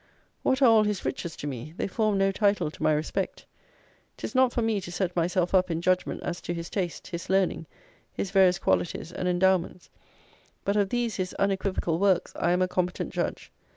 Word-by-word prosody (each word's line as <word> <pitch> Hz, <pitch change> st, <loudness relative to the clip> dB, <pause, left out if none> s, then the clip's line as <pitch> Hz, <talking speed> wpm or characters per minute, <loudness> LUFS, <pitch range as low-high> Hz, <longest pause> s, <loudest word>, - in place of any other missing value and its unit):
What 265 Hz, +1 st, +2 dB
are -, -, +8 dB
all 225 Hz, -2 st, +6 dB
his 210 Hz, -2 st, -2 dB
riches 170 Hz, -2 st, -3 dB
to -, -, -7 dB
me? 145 Hz, +3 st, -6 dB
They -, -, -1 dB
form 210 Hz, +1 st, 0 dB
no 195 Hz, 0 st, +3 dB
title 200 Hz, -5 st, +1 dB
to -, -, -15 dB
my -, -, +3 dB
respect. 155 Hz, +5 st, -2 dB, 0.7 s
'Tis -, -, -5 dB
not 260 Hz, -1 st, +4 dB
for 240 Hz, -, -1 dB
me 220 Hz, -3 st, 0 dB
to 175 Hz, -, -8 dB
set 180 Hz, 0 st, -2 dB
myself 175 Hz, +1 st, +1 dB
up 185 Hz, -1 st, +4 dB
in 165 Hz, -1 st, -1 dB
judgment 185 Hz, +1 st, 0 dB
as 175 Hz, 0 st, -4 dB
to 175 Hz, -, -4 dB
his 170 Hz, 0 st, -6 dB
taste, 180 Hz, -4 st, -3 dB
his 170 Hz, -1 st, -6 dB
learning, 190 Hz, -4 st, +1 dB, 0.4 s
his 190 Hz, -, -4 dB
various 190 Hz, -2 st, +5 dB
qualities 175 Hz, -2 st, -1 dB
and 180 Hz, -, -3 dB
endowments; 180 Hz, 0 st, +1 dB, 0.7 s
but 200 Hz, -, +1 dB
of 200 Hz, -2 st, +2 dB
these 240 Hz, -1 st, -1 dB
his 185 Hz, -1 st, -3 dB
unequivocal 190 Hz, -4 st, 0 dB
works 190 Hz, -3 st, +2 dB
I 170 Hz, -, 0 dB
am 180 Hz, +1 st, +3 dB
a -, -, +1 dB
competent 180 Hz, 0 st, -2 dB
judge. -, -, -3 dB
185 Hz, 200 wpm, -27 LUFS, 175-200 Hz, 0.7 s, are